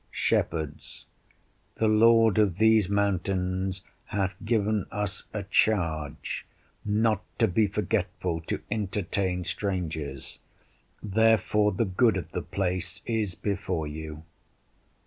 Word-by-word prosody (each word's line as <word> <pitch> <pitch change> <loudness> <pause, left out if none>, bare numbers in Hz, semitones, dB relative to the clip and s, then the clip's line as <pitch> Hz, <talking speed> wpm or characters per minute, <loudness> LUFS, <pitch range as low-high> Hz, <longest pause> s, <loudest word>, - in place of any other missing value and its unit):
Shepherds 80 -2 -2 0.7
The 110 - +1
lord 115 0 +5
of 100 -5 +2
these 110 -2 +4
mountains 95 -1 0 0.2
hath 95 -1 -1
given 110 -3 +1
us 100 -2 -3
a 105 -2 -3
charge 85 -8 0 0.4
"not 105 0 +1
to 115 - +4
be 105 +3 +2
forgetful 95 -5 -1
to - - -2
entertain 95 -3 -1
strangers"; 80 -9 -4 0.6
therefore 105 0 +3
the 115 +5 +1
good 105 +2 +3
of 90 - -5
the - - -2
place 95 0 -3
is 110 -6 -1
before 95 -5 -2
you. 75 0 -7
100 Hz, 110 wpm, -27 LUFS, 90-110 Hz, 0.7 s, lord